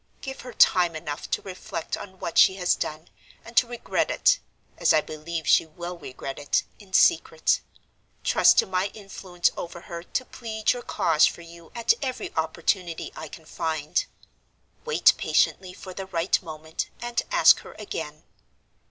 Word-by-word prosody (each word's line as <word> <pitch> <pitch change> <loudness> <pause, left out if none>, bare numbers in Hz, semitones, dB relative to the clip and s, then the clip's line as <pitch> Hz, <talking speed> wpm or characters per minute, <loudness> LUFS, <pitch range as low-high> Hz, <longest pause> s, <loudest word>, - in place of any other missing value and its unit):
Give 265 0 -7
her 250 -1 -9
time 175 -5 +4
enough 150 -1 -5
to - - -1
reflect 185 -3 -5
on 190 -1 -10
what 170 - 0
she 190 - +7
has 180 -2 +2
done, 155 +2 -4 0.4
and 230 - -12
to 240 - +5
regret 240 0 -1
it - - +3 0.4
(as - - +4
I 155 - +4
believe 155 0 -6
she - - +5
will 175 +3 -7
regret 135 -3 -7
it) 145 - +1 0.2
in 200 -3 -16
secret; 160 -3 +3 0.6
trust - - +5
to - - +5
my 185 +1 0
influence 190 -4 -2
over 175 0 -7
her 170 -1 -7
to 255 +8 -3
plead 220 -3 -1
your 245 - -6
cause 165 -8 +3
for - - -6
you 170 0 -14
at 235 - +3
every 260 -2 -4
opportunity 170 +2 -1
I 160 - -7
can 160 +2 -12
find; 155 -1 -1 0.8
wait 465 - +5
patiently 185 -1 +1
for 185 0 -10
the 190 +1 -6
right 175 +1 +1
moment, 160 -2 -6
and 240 0 -1
ask - - +7
her - - -12
again. - - -6
175 Hz, 165 wpm, -25 LUFS, 160-200 Hz, 0.8 s, she